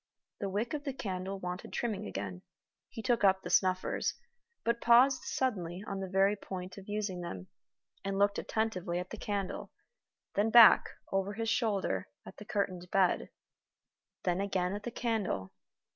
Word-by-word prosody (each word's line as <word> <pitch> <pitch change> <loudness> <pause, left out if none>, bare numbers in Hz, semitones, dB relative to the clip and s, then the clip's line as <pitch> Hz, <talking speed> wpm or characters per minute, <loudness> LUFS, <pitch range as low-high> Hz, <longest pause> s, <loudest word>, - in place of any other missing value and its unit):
The 200 - -2
wick 210 +8 -2
of 295 -1 -3
the 275 -2 -3
candle 190 -3 -4
wanted 180 0 -5
trimming 220 - -2
again. 95 -2 -5 0.5
He 225 - -7
took 240 -3 +2
up 190 -1 +4
the - - -5
snuffers, 185 -1 +2 0.5
but 235 0 0
paused 250 +3 +6
suddenly 185 -8 -2
on 195 -2 -4
the 190 -1 -4
very 195 +2 +3
point 185 -2 -7
of 195 - -13
using 205 -4 -2
them, 95 - -6 0.5
and 195 0 -2
looked 200 0 +3
attentively 190 -6 -1
at 180 +1 -4
the 225 - -5
candle 200 -2 -3 0.6
then 205 +3 +2
back, 230 -1 +9 0.3
over 195 +1 0
his 225 +1 -2
shoulder, 200 - 0 0.2
at - - -11
the 210 - -10
curtained 185 -4 -2
bed 190 -2 +2 0.9
then 180 +1 +1
again 190 -2 0
at 205 - -4
the 240 - -4
candle. 210 - -2
195 Hz, 160 wpm, -32 LUFS, 180-220 Hz, 0.9 s, back